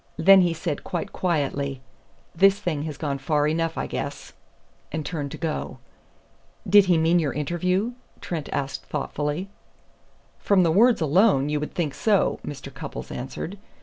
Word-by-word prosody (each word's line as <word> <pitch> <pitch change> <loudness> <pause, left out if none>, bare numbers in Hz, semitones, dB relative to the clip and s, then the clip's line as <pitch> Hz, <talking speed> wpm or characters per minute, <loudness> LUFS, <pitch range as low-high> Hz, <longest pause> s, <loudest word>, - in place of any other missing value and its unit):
Then 195 0 +7
he 175 -2 +1
said 165 -2 -3
quite 175 -3 -4
quietly: 140 -5 -1 0.6
'This 195 +3 +5
thing 175 -8 -2
has 150 -3 -5
gone 140 -3 -3
far 145 +2 +1
enough, 165 +1 -1
I - - -1
guess,' - - -5 0.6
and 155 -1 -3
turned 145 -3 -3
to - - -8
go." 160 -2 -3 0.9
"Did 200 +1 +7
he 180 -3 +3
mean 165 +2 +3
your 155 -4 -1
interview?" 180 - 0 0.3
Trent 160 -4 -5
asked 140 0 -3
thoughtfully. 150 +6 -3 0.9
"From 195 -3 +3
the 165 - +3
words 225 +4 +4
alone 155 -2 +3
you 150 0 0
would 150 - -6
think 155 -6 -1
so," 210 +3 +1
Mr. 135 -1 -7
Cupples 140 +1 -7
answered. 135 +9 -6
160 Hz, 155 wpm, -24 LUFS, 145-180 Hz, 0.9 s, Then